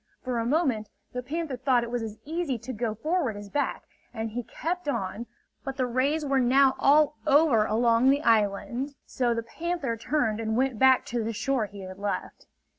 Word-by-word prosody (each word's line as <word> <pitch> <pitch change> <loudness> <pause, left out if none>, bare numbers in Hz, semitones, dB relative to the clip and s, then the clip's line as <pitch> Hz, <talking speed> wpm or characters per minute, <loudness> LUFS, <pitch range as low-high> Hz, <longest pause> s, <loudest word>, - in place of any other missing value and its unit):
For 250 -2 -1
a 230 - -1
moment, 255 -8 +1 0.2
the 250 - -3
panther 300 +2 -3
thought 255 -1 +2
it 235 - -6
was 245 -1 -1
as 220 -1 -6
easy 315 -4 -2
to 245 +3 -7
go 220 -1 -2
forward 290 - -1
as 205 0 -9
back, 290 - -1 0.3
and 225 -2 -4
he 245 +3 -3
kept 335 +8 -4
on. 235 -3 -3 0.4
But 270 -1 -5
the 255 - +1
rays 275 +6 0
were 275 -1 +2
now 260 +2 +5
all 300 +2 +4
over 280 -7 +5
along 230 +3 +3
the 285 +2 +2
island; 230 +5 +1
so 240 -2 0
the 230 - -2
panther 310 0 -3
turned 230 -3 0
and 220 0 -1
went 260 -3 0
back 260 -1 +5
to 235 -1 -2
the 225 +1 -2
shore 250 0 0
he 200 -1 -11
had 185 0 -9
left. 200 -2 -4
250 Hz, 195 wpm, -27 LUFS, 225-280 Hz, 0.4 s, now